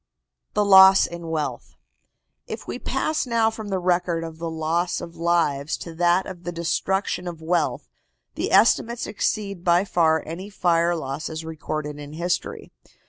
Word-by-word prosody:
THE 210 -1 +2
LOSS 190 -1 +8
IN 170 -1 -7
WEALTH. 155 -2 -4 0.7
If - - -7
we - - -5
pass 310 -4 -1
now 230 -2 +2
from 220 -1 -7
the 195 -2 -1
record 175 -2 0
of 165 -1 -8
the 165 0 -3
loss 165 +2 -1
of 170 - -9
lives 165 -4 0
to 170 - -8
that 175 +2 +2
of 180 -2 -9
the 175 - -4
destruction 180 +2 -1
of 170 -2 -6
wealth, 165 +1 -1 0.5
the - - -3
estimates 230 +3 +3
exceed 200 -3 -2
by 175 +1 +3
far 160 -4 +2
any 180 +5 -7
fire 175 -3 +1
losses 155 +2 -5
recorded 155 -2 -5
in 145 0 -9
history. 175 +3 -3
170 Hz, 155 wpm, -23 LUFS, 160-190 Hz, 0.7 s, LOSS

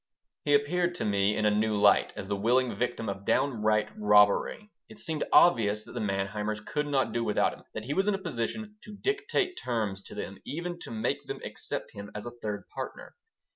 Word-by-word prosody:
He 145 -1 +5
appeared 175 +5 +1
to - - -2
me 100 0 +2
in 110 - +1
a 105 - +5
new 110 +1 +1
light, 100 0 +5
as 95 - -6
the 100 - 0
willing 120 +5 +2
victim 120 -2 -2
of 100 0 -4
downright 110 -4 +2
robbery. 105 - +3 0.2
It 220 - -12
seemed 160 -6 -2
obvious 105 -10 +5
that - - -13
the - - -4
Manheimers 105 +1 -1
could 150 0 -1
not 140 -2 +1
do 120 - 0
without 105 - +2
him, - - -14
that 110 - -4
he 140 - -2
was 195 +4 +1
in 210 - +3
a - - -2
position 210 - -4
to 210 -1 -10
dictate 405 - 0
terms 110 -5 -1
to - - -10
them, 95 - -6
even 175 +3 -4
to - - -8
make 110 -1 -2
them - - -4
accept - - -4
him 100 0 -8
as 105 - -5
a 120 - -5
third 105 -2 -3
partner. - - -6
115 Hz, 210 wpm, -29 LUFS, 105-170 Hz, 0.2 s, He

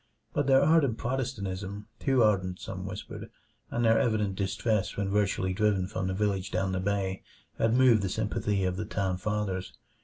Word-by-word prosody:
But 145 -2 0
their 135 0 +6
ardent 145 -7 +3
Protestantism 105 -6 -3
too 130 -3 +3
ardent, 95 -4 +1
some 95 0 -6
whispered 100 +1 -7 0.4
and 120 0 0
their 115 0 +5
evident 105 -5 +1
distress 100 +2 -1
when 100 -1 -1
virtually 100 -2 +1
driven 100 -2 +2
from 95 0 -3
the 95 - -2
village 100 -2 0
down 95 -1 -1
the 95 - -1
bay, 95 0 -1 0.4
had 115 +1 +3
moved 125 -4 +5
the 95 - -1
sympathy 105 -1 -1
of 90 0 -1
the 105 - -3
town 95 -3 -1
fathers. 100 -2 -2
100 Hz, 175 wpm, -29 LUFS, 95-115 Hz, 0.4 s, their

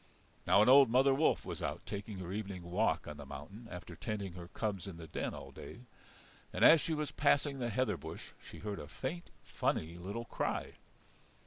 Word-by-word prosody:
Now 100 - +7
an - - +2
old 135 0 +8
mother 135 +3 +5
wolf 150 +4 +2
was - - -5
out - - -3
taking 100 0 -5
her 90 -1 -6
evening 100 -4 -4
walk 90 +6 +1
on 75 0 -6
the 75 - -7
mountain 100 - -9
after 90 -1 -8
tending 100 0 -4
her 85 -1 -8
cubs 100 -1 -3
in 95 -4 -7
the 85 - -8
den 80 - -3
all - - -9
day. - - -10 0.7
And - - +3
as 160 -2 +9
she 160 - -1
was 150 -2 -2
passing 145 -1 +2
the 120 -1 -1
heather 110 -4 +1
bush 80 +3 -8
she - - -10
heard 105 -1 -4
a 75 - -7
faint, 145 - -5
funny 85 +2 -1
little 100 +6 -5
cry. - - -2
105 Hz, 200 wpm, -34 LUFS, 90-130 Hz, 0.7 s, as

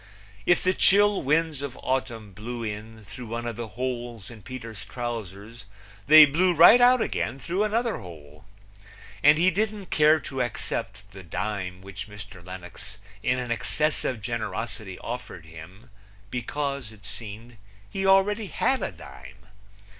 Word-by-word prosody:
If 175 - +4
the 185 - +3
chill 205 +1 +4
winds 155 0 +1
of 140 -3 -6
autumn 120 -5 -2
blew 115 +4 -6
in 110 0 -7
through 120 +4 -9
one 115 +1 -4
of 120 -2 -3
the 120 0 -5
holes 120 -4 -4
in 110 -2 -12
Peter's 115 -4 -8
trousers 115 -2 -6 0.4
they 155 +1 +11
blew 175 +5 +2
right 215 +10 +8
out 245 -1 +6
again 120 - -2
through 175 +8 -1
another 230 +2 0
hole. 75 -4 -12 0.8
And 150 +1 +6
he 180 +3 +4
didn't 205 0 -2
care 155 +1 +5
to 135 -1 -4
accept 105 -4 -4
the 95 0 -10
dime 90 +1 -4
which 95 0 -8
Mr. 105 -3 -11
Lenox 95 +3 -10 0.2
in 125 - +1
an 125 -2 -4
excess 150 +6 0
of 115 -5 -3
generosity 110 -3 -4
offered 115 -9 -7
him, 90 - -13 0.4
because, 140 -1 -3
it 105 -2 -16
seemed, 115 +2 -6 0.3
he 195 - -4
already 195 +2 +3
had 260 +7 0
a - - -2
dime. 65 -7 -13
120 Hz, 150 wpm, -26 LUFS, 100-150 Hz, 0.8 s, they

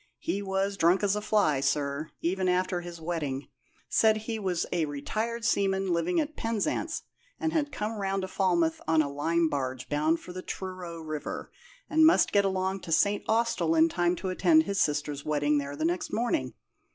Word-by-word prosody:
He 195 +4 -2
was 195 0 0
as 200 - -8
drunk 175 +3 +3
as 200 0 +2
a 210 - -2
fly, 205 -10 +2
sir, 140 +2 -1
even 185 +2 0
after 180 0 +1
his 175 -1 -8
wetting. 155 -5 -3 0.4
Said 220 -1 +4
he 220 +1 -4
was 185 -4 -1
a 170 -3 +1
retired 220 +11 -3
seaman 195 -4 +1
living 335 - +1
at 310 0 -2
Penzance, 225 +5 -2 0.4
had 315 -2 0
come 210 -4 -3
round 195 -1 -1
to - - -2
Falmouth 175 -4 +1
on 160 -1 +4
a 140 - -4
lime 165 +3 +1
barge 130 -4 -3
bound 155 +3 +1
for 180 - -10
the 185 - -5
Truro 185 -3 -6
river, 155 -2 -5 0.4
and 315 +1 +3
must 320 +2 +5
get 200 -1 +3
along 190 0 -1
to 170 - -8
St. 200 +5 +2
Austell 220 -8 +2
in 160 +1 +5
time 175 +1 +1
to 190 - -4
attend 315 - +4
his 200 -8 -1
sister's 145 -1 -1
wedding 150 -1 +1
there 140 0 -5
next 165 +4 -1
morning. 245 +8 -1
180 Hz, 185 wpm, -28 LUFS, 160-205 Hz, 0.4 s, must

